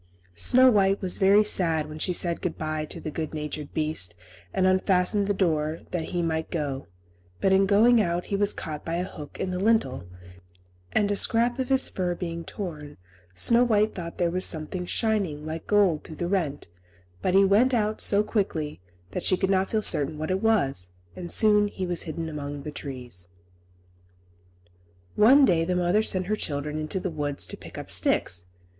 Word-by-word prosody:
Snow 255 - +4
White 195 -2 +2
was 185 -2 -1
very 200 +2 +5
sad 165 -7 +1
when 155 0 -9
she 180 - +1
said 170 -1 +1
good 180 -3 -3
bye 155 0 -3
to - - -5
the 155 - -6
good 155 0 -5
natured 150 -1 -5
beast, 155 - -2 0.4
and 190 -1 0
unfastened 185 +1 +2
the - - +1
door, 160 -4 0
that 170 -3 -2
he 175 -1 -2
might 160 -1 -2
go; 140 -4 -4 0.5
but 190 - +2
in 195 0 +4
going 225 +4 +5
out 175 -2 -1
he 200 - -3
was 205 +1 +1
caught 150 -2 -6
by 165 - -3
a 175 - -1
hook 150 -5 -9
in 185 - -2
the 180 - -3
lintel, 185 - +1 0.8
and 205 -1 +1
a - - +1
scrap 235 +4 +1
of 260 0 -2
his 265 -1 +3
fur 180 -2 -2
being 170 -1 -5
torn, 155 -6 -7 0.4
Snow 235 - +4
White 215 -2 +2
thought 170 -3 -7
there 175 -1 0
was 185 +1 0
something 175 +3 0
shining 195 -11 -1
like 160 +1 -6
gold 200 -7 +2
through 160 - -10
the 175 - -3
rent; 165 -7 -2 0.5
but 185 - 0
he 195 0 +6
went 215 +7 +4
out 215 -3 0
so 205 0 +3
quickly 160 - -2 0.3
that - - -3
she 185 - +1
could 190 +1 0
not 190 0 +1
feel 220 -1 -1
certain 150 -2 +4
what 155 +3 -3
it 190 +1 -1
was, 135 - +1 0.2
and 175 -1 -7
soon 210 -2 +4
he 190 -2 -5
was 175 -2 0
hidden 160 0 -5
among 145 -2 -6
the 150 - -6
trees. 125 - -7 1.9
One 265 +7 +6
day 170 -7 +2
the 180 +2 -1
mother 180 +4 +2
sent 185 -4 0
her 210 +3 0
children 150 -4 -3
into 155 +5 -3
the 185 -1 -4
wood 145 -2 -3
to - - -1
pick - - -12
up - - -5
sticks. 90 0 +2
180 Hz, 195 wpm, -26 LUFS, 155-200 Hz, 1.9 s, he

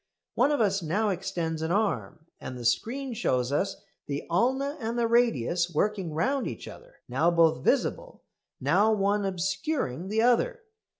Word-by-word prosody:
One - - +3
of 295 - +1
us 200 -3 +2
now 200 +7 0
extends 170 -4 -3
an 160 - -2
arm 160 - -1
and 130 - -7
the 120 - -7
screen 240 - 0
shows 130 - 0
us 150 +7 0 0.3
the 145 0 -3
ulna 265 - +1
and 230 0 -3
the 235 - +2
radius 180 - +2
working 185 -1 -1
round 265 - 0
each - - -7
other, - - -13
now 170 - +2
both 165 -6 +3
visible, - - 0 0.4
now 185 +11 +3
one 200 0 +1
obscuring 190 - -2
the 220 +3 +1
other. 455 - +2
195 Hz, 160 wpm, -27 LUFS, 160-235 Hz, 0.4 s, One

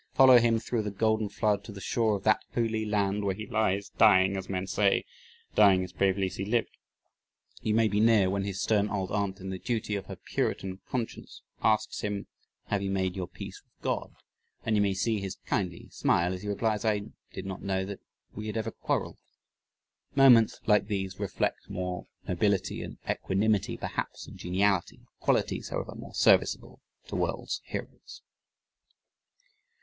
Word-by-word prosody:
Follow 130 -2 +8
him 115 -1 +3
through 115 +1 -1
the 105 - -3
golden 110 +1 +1
flood 105 -1 0
to 110 - -9
the 100 - -9
shore 110 +2 +1
of 100 - -5
that 110 0 +3
"holy 110 -2 0
land," 105 -1 0
where 95 -2 0
he 105 +1 -6
lies 100 -4 0
dying 95 -3 +6
as 95 0 -5
men 95 -1 -2
say 100 +1 +2 0.5
dying 95 -3 +6
as 90 -1 -8
bravely 95 0 +2
as 95 - -5
he 95 - -2
lived. 115 +3 0 0.9
You 110 - +1
may 115 0 +4
be 105 0 0
near 110 -3 +5
when 100 +1 0
his 100 -1 -4
stern 105 -1 +2
old 95 -2 -2
aunt 100 -2 -1
in 95 0 -5
the 95 - -5
duty 110 -2 -2
of 95 -1 -5
her - - -6
Puritan 95 0 -2
conscience 120 -3 -5 0.2
asks 110 -1 +1
him: 100 -1 -3 0.4
"Have 100 -1 -1
you 100 - -2
made 95 -2 0
your 95 -2 -3
peace - - -9
with - - -45
God"? - - -2 0.5
and 110 - +2
you 105 - +3
may 100 -1 +1
see 110 +3 0
his 95 -1 -4
kindly 90 -4 -2
smile 90 +2 +1
as 90 - -6
he 105 - -7
replies, 105 +1 0
"I 105 -2 +2 0.3
did - - -7
not 95 -1 -5
know 95 -1 -1
that 100 0 -6 0.3
we 105 +1 -6
had 110 - -3
ever 110 0 -2
quarreled." - - -2 1.0
Moments 125 -5 +6
like 105 -2 +4
these 95 -2 -3
reflect 100 -2 -2
more 90 0 -4 0.2
nobility 95 +2 0
and - - -7
equanimity 100 +1 +1
perhaps - - -4
than - - -11
geniality 95 +1 0 0.2
qualities, - - 0
however, - - -4
more - - -10
serviceable - - +3 0.2
to - - -6
world's - - -2
heroes. - - -8
100 Hz, 175 wpm, -29 LUFS, 95-110 Hz, 1.0 s, Follow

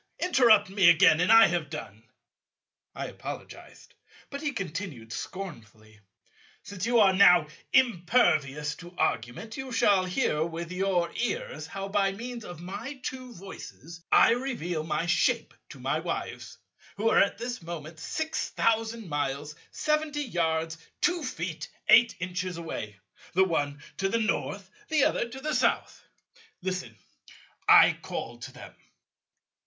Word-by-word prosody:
Interrupt 230 - +4
me 195 -3 +6
again, 170 -1 +6
and 180 - +3
I 225 0 +9
have 170 -4 -1
done." 105 -3 -8 0.9
I - - -4
apologized; - - -9 0.4
but 280 0 -5
he 295 -2 -1
continued 165 - -6
scornfully, 110 - -8 0.6
"Since 200 +1 -5
you 240 -1 +4
are 190 -4 +6 0.3
impervious 170 - +2
to 175 0 -12
argument, 120 - -2
you 265 -1 -6
shall 200 -5 +3
hear 180 - 0
with 170 +1 -5
your 180 -2 0
ears 485 - -3
how 195 0 -5
by 195 -1 +1
means 235 +2 -7
of 175 -6 -9
my 200 +10 -6
two 255 -1 -6
voices 170 -3 -11
I - - +7
reveal 230 -11 -2
my 155 +1 -1
shape 165 -1 +1 0.2
to - - -11
my - - -1
Wives, - - -5 0.4
who 215 +3 0
are - - +5
at 200 - +2
this 240 0 -5
moment 160 -1 -8
six 315 - -3
thousand 225 -1 0
miles 145 0 -3 0.2
seventy 305 -1 -1
yards 165 - -1 0.2
two 355 -1 +2
feet 165 - -5 0.2
eight 235 0 +6
inches 180 0 -3
away, 105 -11 -6 0.4
the 190 - +5
one 145 -4 -2
to 195 0 0
the 230 - +1
North, 225 -1 -2 0.2
the 310 -4 +3
other 280 -5 +1
to 260 +3 -8
the 305 +3 -2
South. - - 0 0.6
Listen, 180 -12 -4 0.7
I - - +7
call 120 +1 -6
to 130 +3 -8
them." - - -12
185 Hz, 140 wpm, -28 LUFS, 160-230 Hz, 0.9 s, I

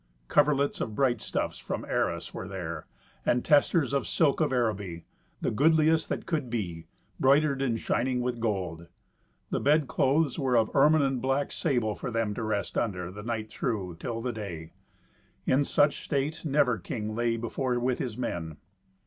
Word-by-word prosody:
Coverlets 145 -1 +3
of 110 - -3
bright 125 -3 +2
stuffs - - -2
from - - -4
Arras - - -1
were - - -6
there, 85 -5 -5 0.4
and 120 - +1
testers 145 -2 +3
of 140 - 0
silk 160 -2 +2
of 155 - +2
Araby, 105 -9 -1 0.4
the - - 0
goodliest 160 +5 +3
that - - -3
could 155 -7 -2
be, 85 -9 -4 0.3
broidered 140 +1 +4
and 120 -4 0
shining 125 +4 0
with 125 -1 -2
gold. 90 -7 -2 0.6
The - - +1
bed 150 0 +3
clothes 140 +4 +2
were 130 -4 +2
of 110 -1 +1
ermine 150 +2 +5
and 135 -3 0
black 135 +2 0
sable, 120 -9 0
for - - -5
them 115 -3 -1
to 110 - -5
rest 105 -3 -1
under, 90 -6 -2
the 105 +2 -8
night 110 -1 -3
through, 95 -9 -3
till 115 0 -4
the 125 -1 -2
day. 85 -7 -6 0.7
In 135 +2 +3
such 145 +1 +2
state 145 +3 -1
never 140 -6 +2
king 105 +4 -4
lay 115 0 0
before 125 +2 -1
with 125 +1 0
his 120 -4 -3
men. 80 -10 -4
120 Hz, 170 wpm, -28 LUFS, 105-140 Hz, 0.7 s, ermine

